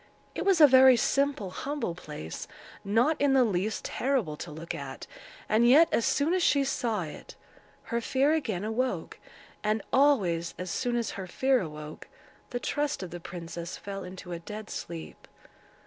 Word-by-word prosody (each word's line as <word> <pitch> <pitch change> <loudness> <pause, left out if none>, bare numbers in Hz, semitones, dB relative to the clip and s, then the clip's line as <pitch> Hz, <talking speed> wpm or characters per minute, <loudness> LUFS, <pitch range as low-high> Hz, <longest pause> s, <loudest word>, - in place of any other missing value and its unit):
It - - -3
was 390 -3 +4
a 305 - +10
very 260 -2 +7
simple, 275 -8 0
humble 280 - -3
place, 150 - -8 0.4
not 235 +11 +2
in 285 -1 +4
the 265 -1 +5
least 210 0 -1
terrible 245 - -1
to 170 - -7
look 160 +3 -6
at, 135 -1 -7 0.4
and 230 +3 +4
yet, 310 +6 +7
as 230 - +2
soon 295 +5 +2
as 370 - +2
she 280 -4 +3
saw 235 -7 -1
it, 155 - -10 0.5
her 235 0 -2
fear 275 +5 +2
again 220 - -1
awoke, 240 +4 -2 0.4
and 215 0 0
always, 195 -13 +3
as 180 0 -5
soon 245 -1 -1
as 235 -2 -1
her 190 -2 -6
fear 260 +7 +2
awoke, 150 -2 -8 0.4
the 245 - -3
trust 290 -4 -2
of 180 - -7
the 175 - -6
princess 170 0 -7
fell 195 -1 -6
into 180 0 -9
a 170 - -4
dead 210 +5 -8
sleep. 165 -1 -7
220 Hz, 170 wpm, -28 LUFS, 175-270 Hz, 0.5 s, a